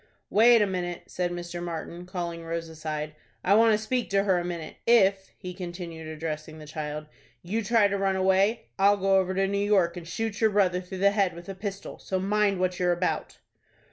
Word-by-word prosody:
"Wait 230 +1 +6
a - - +3
minute," 180 -2 -3
said 180 -1 -2
Mr. 175 0 -5
Martin, 170 +1 -6
calling 170 -2 -4
Rose 165 0 -4
aside, 155 -1 -5 0.3
"I 195 - +4
want 225 +1 +6
to - - +3
speak 240 +3 -2
to 195 0 +2
her 190 -3 +2
a - - -3
minute. 170 -3 -6
If," 195 -4 +4
he 180 0 -7
continued, 175 -3 -7
addressing 155 0 -5
the 155 - -10
child, 150 0 -5 0.4
"you 215 +6 -2
try 220 0 +4
to 200 0 -2
run 195 -1 +1
away, 190 +4 +2
I'll 200 +1 +5
go 195 0 +3
over 190 0 +1
to 195 0 +2
New 200 +1 -1
York, 190 -4 +2
and 170 -1 -8
shoot 220 +5 -3
your 220 - +5
brother 190 -3 +2
through 185 +1 -8
the 200 - +6
head 200 -3 +1
with 170 +2 -10
a - - -3
pistol. 195 0 -6
So 190 - -2
mind 200 0 +1
what 185 -1 0
you're 180 -1 +2
about." 175 +1 -2
185 Hz, 210 wpm, -27 LUFS, 170-200 Hz, 0.4 s, Wait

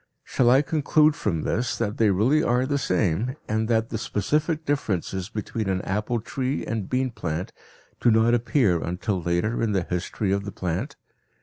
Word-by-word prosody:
Shall 120 -2 +2
I 130 +4 +5
conclude 155 0 +3
from 85 - -2
this 120 +3 -1
that 105 -3 -2
they 110 -2 +4
really 115 +11 +3
are 125 -1 +2
the 140 +1 0
same 100 - 0
and 110 +1 0
that 115 -1 +1
the 110 - -3
specific 150 - -1
differences 95 - -2
between 110 -1 -3
an 95 -1 -1
apple 105 +5 -1
tree 130 +4 -3
and 110 -3 -3
bean 130 0 0
plant 85 -4 -4 0.5
do - - +3
not 110 +1 +4
appear 120 - +2
until 90 +2 -2
later 85 +7 0
in 110 -2 +1
the 95 -3 +1
history 90 +3 -2
of 100 0 0
the 100 - -6
plant? 95 - -3
110 Hz, 180 wpm, -25 LUFS, 95-130 Hz, 0.5 s, I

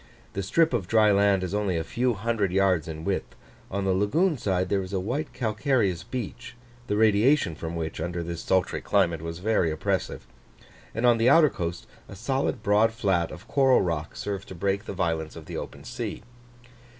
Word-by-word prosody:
The 100 - -2
strip 160 - +2
of 105 -8 -1
dry 110 0 +4
land 100 -1 +3
is 90 - -3
only 100 -4 0
a 80 - -1
few 120 +8 0
hundred 105 -2 -1
yards 95 -4 +2
in 80 0 -6
width; 100 -1 -2 0.3
on 100 0 -2
the 95 - +2
lagoon 155 - +2
side 95 -6 0
there 100 +1 +1
is 95 +1 -7
a 95 - +1
white 130 - -3
calcareous 110 - 0
beach, 120 +3 -6 0.3
the 105 - 0
radiation 110 - +4
from 80 +1 -6
which 80 -1 -4
under 85 +1 -3
this 85 0 -5
sultry 95 -1 0
climate 85 -5 +1
was 85 0 -5
very 95 -3 +1
oppressive; 80 0 -2 0.7
and 115 +2 0
on 120 -2 +5
the 115 +2 +4
outer 155 -3 +6
coast, 85 -7 -4 0.2
a - - -9
solid 125 +1 -1
broad 105 +2 +4
flat 95 -7 +1
of 90 - -11
coral 135 -2 +4
rock 80 -4 -3
served 100 -1 -4
to 95 - -9
break 100 +4 -1
the - - -5
violence 80 -4 -2
of - - -10
the - - -6
open - - -7
sea. - - -5
100 Hz, 195 wpm, -26 LUFS, 85-115 Hz, 0.7 s, outer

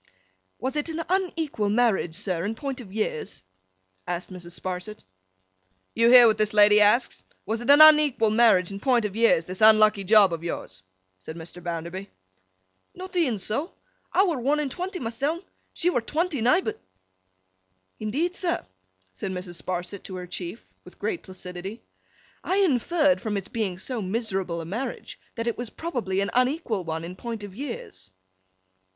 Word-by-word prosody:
'Was 260 +2 -3
it 300 +2 -1
an 325 +1 -3
unequal 325 - -1
marriage, 210 -7 +1
sir, 180 -3 -1
in 215 +3 -2
point 270 +1 -5
of 200 -6 -12
years?' 205 - -4 0.6
asked 180 +2 -4
Mrs. 175 -1 -9
Sparsit. 185 +3 -6 0.9
'You 230 +1 +4
hear 245 -1 +9
what 220 -2 +3
this 215 0 +1
lady 210 0 +7
asks. 210 +5 +3 0.2
Was 220 +2 -2
it 240 - -5
an 290 +2 +8
unequal 300 -8 +6
marriage 215 -5 +4
in 195 - -6
point 245 -1 +2
of 205 -1 -4
years, 225 -8 +3
this 185 +3 -7
unlucky 215 -2 +6
job 200 -2 +5
of 165 0 -5
yours?' 95 - -6 0.4
said 160 +12 -9
Mr. 170 +2 -10
Bounderby. 170 +3 -5 0.9
'Not 370 +1 -8
e'en 290 -11 +1
so. 255 - -3 0.4
I 380 - +4
were 330 -8 -1
one 280 +5 +1
and 290 -3 -2
twenty 365 +4 -4
myseln; 275 +9 -2 0.3
she 355 - 0
were 245 - 0
twenty 310 +2 -1
nighbut.' 250 +12 +2 1.2
'Indeed, 290 +12 -1
sir?' 350 -3 -2 0.5
said 95 - -5
Mrs. 180 -3 -6
Sparsit 180 +3 -4
to 185 - -7
her 180 0 -6
Chief, 180 +3 -7 0.2
with - - -15
great 375 -6 -3
placidity. 185 +3 -8 0.6
'I 375 - 0
inferred, 305 - +2
from 215 -3 -2
its 195 0 -6
being 205 -6 -2
so 230 +4 -4
miserable 190 -4 -2
a - - -7
marriage, 230 +9 -5 0.2
that 230 - -3
it 235 -1 -2
was 245 -2 -4
probably 230 - -3
an 200 - -2
unequal 250 - 0
one 160 0 -4
in 175 +2 -7
point 230 +1 -6
of 200 -2 -8
years. 205 - -7
220 Hz, 165 wpm, -25 LUFS, 185-270 Hz, 1.2 s, hear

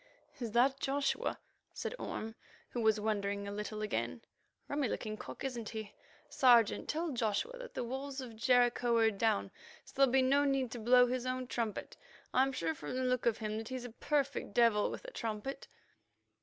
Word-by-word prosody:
"Is 230 -4 -4
that 265 +3 +4
Joshua?" 275 +1 0 0.4
said - - -3
Orme, 220 +1 -4 0.4
who 240 - -2
was 220 -1 +3
wandering 200 -1 -1
a - - -4
little 210 +1 -4
again. 210 - -2 0.4
"Rummy 285 -2 0
looking 215 0 -3
cock, - - -8
isn't 240 -5 -3
he? 220 -2 -6 0.3
Sergeant, 240 -4 +4
tell 325 +1 -1
Joshua 235 - -1
that - - -9
the - - -1
walls 265 +3 -4
of 245 -4 -7
Jericho 245 0 +3
are 225 -1 +4
down, 195 - 0 0.3
so - - -15
there'll 270 -2 +5
be 265 0 +4
no 280 +2 +4
need 270 -4 +1
to 240 - -5
blow 245 +2 +6
his 250 0 -2
own 255 0 -2
trumpet. 230 -4 -3 0.4
I'm 265 +1 +4
sure 165 -11 -1
from 150 +7 -6
the 260 - 0
look 250 -1 +1
of 230 - +2
him 215 -1 -3
that 225 - -6
he's 255 -1 -4
a 245 - -7
perfect 280 -3 -1
devil 230 -3 +4
with - - -7
a - - -7
trumpet." 230 - -4
240 Hz, 185 wpm, -34 LUFS, 220-265 Hz, 0.4 s, blow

